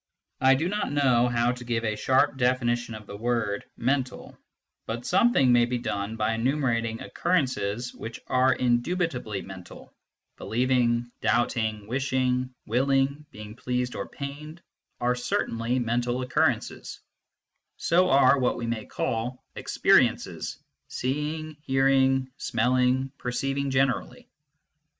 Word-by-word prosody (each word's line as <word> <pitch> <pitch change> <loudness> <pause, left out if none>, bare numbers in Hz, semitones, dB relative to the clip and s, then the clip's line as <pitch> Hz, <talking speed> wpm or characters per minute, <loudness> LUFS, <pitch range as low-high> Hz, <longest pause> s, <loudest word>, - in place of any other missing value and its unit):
I 130 0 +5
do 160 +6 0
not 205 -2 -2
know 130 -4 +3
how 120 0 +1
to 125 0 -7
give 120 -1 -1
a 110 -1 0
sharp 130 +6 +2
definition 120 -2 0
of 105 -1 -10
the 100 - -9
word 110 -2 -1
" - - -44
mental," 130 -3 -3 0.5
but 115 +2 -4
some 235 +6 +4
thing 130 - +4
may 120 0 +5
be 125 +1 -2
done 105 -2 -3
by 110 0 0
enumerating 115 -2 0
occurrences 125 - -1
which 115 0 -8
are 130 +1 +3
indubitably 125 - 0
mental: 95 -2 -11 0.4
believing, 120 0 +1
doubting, 110 -1 0
wishing, 130 +1 0
willing, 135 +4 +1
being 105 -4 -10
pleased 125 0 -2
or - - -5
pained, 150 +4 -8 0.4
are 125 +1 +2
certainly 120 -1 -1
mental 120 +1 0
occurrences; 125 - -1 0.8
so 180 +2 +3
are 135 0 +5
what 125 - +1
we 120 - -4
may 115 -2 -3
call 120 +3 -3
experiences, - - +1 0.3
seeing, 150 +4 -3
hearing, 135 -1 +2
smelling, 125 +3 +1
perceiving 135 +3 -2
generally. 130 -1 0
125 Hz, 125 wpm, -26 LUFS, 115-135 Hz, 0.8 s, I